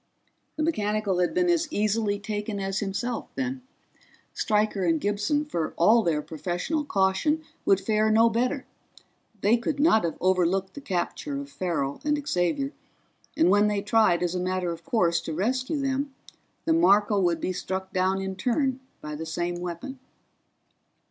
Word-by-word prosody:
The 310 - -1
mechanical 210 - 0
had 180 - +2
been 360 0 +3
as 345 -2 +2
easily 210 -2 +1
taken 205 0 -4
as 195 0 -2
himself, 215 +4 -3
then. 260 0 -3 0.7
Stryker 210 -2 +1
and 165 -2 +2
Gibson, 210 - 0
for 170 - -3
all 220 +7 +5
their 155 -6 0
professional 175 - -2
caution, 215 +7 +1 0.2
would 195 - +4
fare 215 +2 +1
no 225 +1 +5
better 250 +4 0 0.8
they 215 +4 +4
could 280 +5 -3
not 285 - +4
have 170 - -2
overlooked 185 +1 +1
the 285 - -8
capture 275 +8 -3
of 280 0 -8
Farrell 155 - -2
and 295 0 +1
Xavier, 180 +10 0 0.7
and 325 +2 +4
when 205 +1 +5
they 205 -1 -1
tried 210 -5 +3
as 175 0 0
a 180 - -1
matter 185 -1 -1
of 165 0 -7
course 170 -7 +1
to 160 - -5
rescue 255 - -1
them 275 0 -2 0.5
the 325 - +3
Marco 210 -10 +4
would 175 -3 +1
be 185 - -2
struck 190 +1 -4
down 190 +1 +1
in 190 0 -4
turn 255 +6 0 0.2
by 150 - -5
the 160 +2 -5
same 175 +2 -3
weapon. 180 +10 -6
205 Hz, 160 wpm, -26 LUFS, 180-260 Hz, 0.8 s, all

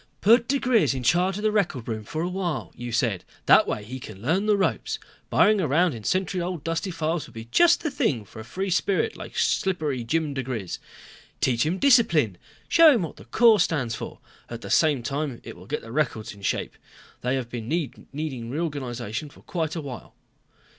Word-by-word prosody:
"Put 235 +3 +5
diGriz 255 - +2
in 130 - -4
charge 180 +7 +2
of 210 - -5
the 215 - +3
record 170 - 0
room 110 -2 -3
for 155 +9 -4
a - - 0
while, 175 - -3
you 120 0 -6
said, 115 -5 0 0.2
that - - +6
way 105 - -2
he 125 +5 -7
can 110 -5 -10
learn 170 - 0
the 210 -1 +4
ropes. 195 - 0 0.3
Burrowing 210 -2 +4
around 165 +2 +2
in 115 -3 -8
century 185 - 0
old, 175 -3 -4
dusty 165 +3 -2
files 165 -2 -2
will - - -18
be 115 0 -7
just 345 0 +5
the 310 - -1
thing 220 - 0
for 105 - -12
a - - -6
free 185 - -4
spirit 185 +2 +1
like - - -9
Slippery 155 - 0
Jim 155 +4 -1
diGriz. 125 -8 -4 0.6
Teach 125 +1 +2
him 175 +4 0
discipline. 170 - +4 0.3
Show 325 -4 +7
him 215 - 0
what 160 - -6
the - - -13
Corps 230 -3 +5
stands 145 -9 +1
for. - - -6 0.3
At 120 -1 -7
the - - -7
same 150 -6 +3
time 140 -1 -3
it - - -9
will - - -14
get 150 +4 -3
the 115 - -10
records 115 -5 -1
in 100 - -15
shape. 100 - -2 0.4
They 125 +2 0
have 125 -3 -4
been 115 -2 -5 0.4
needing 135 -5 -4
reorganization 130 -4 -3
for - - -18
quite 160 -3 -2
a 165 - -3
while." 130 -5 -9
150 Hz, 200 wpm, -25 LUFS, 120-185 Hz, 0.6 s, Show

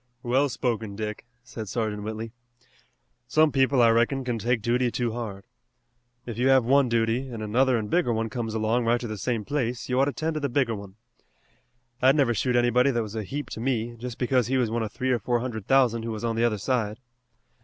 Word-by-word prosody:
"Well 130 +4 +2
spoken, 110 -4 -2
Dick," 105 +2 -5 0.2
said 110 -5 -7
Sergeant 110 -2 -2
Whitley. 110 +1 -5 1.0
"Some 155 -1 +4
people, 135 -2 +3
I 115 - +6
reckon, 120 +4 +2
can 120 -2 -2
take 120 0 0
duty 125 +1 +2
too 120 0 -1
hard. 110 -4 -6 0.8
If 115 -1 -6
you 125 - +3
have 130 -3 +5
one 135 +1 +4
duty 115 +3 0
an' 115 -3 -6
another 125 +4 +2
an' 110 - -2
bigger 165 +1 +1
one 115 0 -1
comes 115 0 -4
along 110 +2 +1
right 120 +1 +2
to 120 - -5
the 110 - -4
same 115 0 -2
place 125 -5 -2
you 125 +1 +1
ought 135 - +5
to 145 - -1
'tend 160 +1 -2
to 155 - -2
the 140 -1 -1
bigger 125 -2 +1
one. 100 -2 -8 1.1
I'd 130 +2 +5
never 135 -5 +3
shoot 125 +2 0
anybody 120 +2 +3
that 120 -3 0
was 105 -1 -8
a 110 - -3
heap 145 +8 -5
to - - -5
me 120 -1 -1
just 120 0 -7
because 125 -2 +1
he 130 +1 +1
was 120 -4 +1
one 115 0 -1
of 110 -2 -3
three 130 0 -1
or 120 - +2
four 120 +3 0
hundred 115 -4 -5
thousand 125 -4 +3
who 115 - -5
was 110 0 -5
on 115 -1 -1
the 115 +1 +2
other 110 -3 +1
side. 110 -1 -1
120 Hz, 230 wpm, -26 LUFS, 110-130 Hz, 1.1 s, I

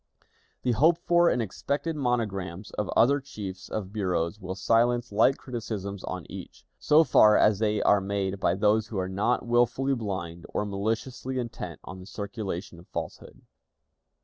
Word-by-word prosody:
The 125 - +2
hoped 160 +8 +4
for 175 0 +5
and 125 - +1
expected 140 - -3
monograms 105 - -2
of 105 - -3
other 140 +5 +5
chiefs 100 -8 -8
of 100 -2 -4
bureaus 90 -2 -1
will 95 -2 -5
silence 120 +4 +2
like 115 +6 +4
criticisms 105 -6 -5
on 90 -2 -5
each, - - -10
so 155 +2 +5
far 105 -8 +6
as 105 -2 +4
they 105 -1 +1
are 100 -1 +4
made 100 0 -2
by 90 - +2
those 105 +2 +2
who 110 - -5
are 95 -1 -1
not 100 +7 0
willfully 120 +3 +2
blind, 95 -8 -4
or 105 - -2
maliciously 115 +6 -3
intent 120 -2 -5
on 95 - -9
the 90 - -11
circulation 100 -4 -5
of 85 - -16
falsehood. - - -7
105 Hz, 160 wpm, -27 LUFS, 95-120 Hz, -, far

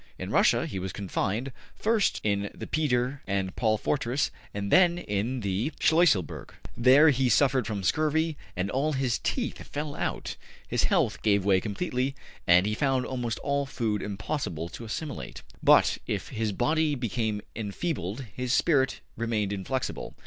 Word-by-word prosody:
In - - -5
Russia - - +4
he 95 - -4
was 95 0 -4
confined, 105 +5 -2 0.2
first 220 -2 +1
in 100 -1 0
the - - -6
Peter 135 -3 0
and 95 -1 -1
Paul 110 -2 +2
fortress 130 +3 0 0.2
and 100 -1 -4
then 175 -2 +5
in 120 - -2
the 100 +8 -1
Schluesselburg. 160 - +2 0.2
There 135 +6 +6
be 130 -1 +1
suffered 130 +1 +3
from 100 -3 -3
scurvy 155 - +1 0.2
and 90 +2 -2
all 145 +4 0
his 130 -3 0
teeth - - -2
fell 145 0 -4
out. - - -3 0.3
His - - +1
health - - +1
gave 100 -3 +2
way 95 -2 +4
completely, 130 - -2 0.3
and 90 +2 +6
he 105 - 0
found 135 +1 +1
almost 120 -3 -3
all 140 0 0
food 110 -5 -1
impossible 100 - -3
to 115 - -8
assimilate. 145 +6 -6 0.2
``But, - - +5
if - - -3
his 110 -1 -2
body 150 +8 +1
became 110 -4 -2
enfeebled, 110 - -3
his 125 0 -1
spirit 135 -5 +2 0.2
remained 110 -3 -1
inflexible. 115 +7 -3
120 Hz, 155 wpm, -28 LUFS, 100-140 Hz, 0.3 s, There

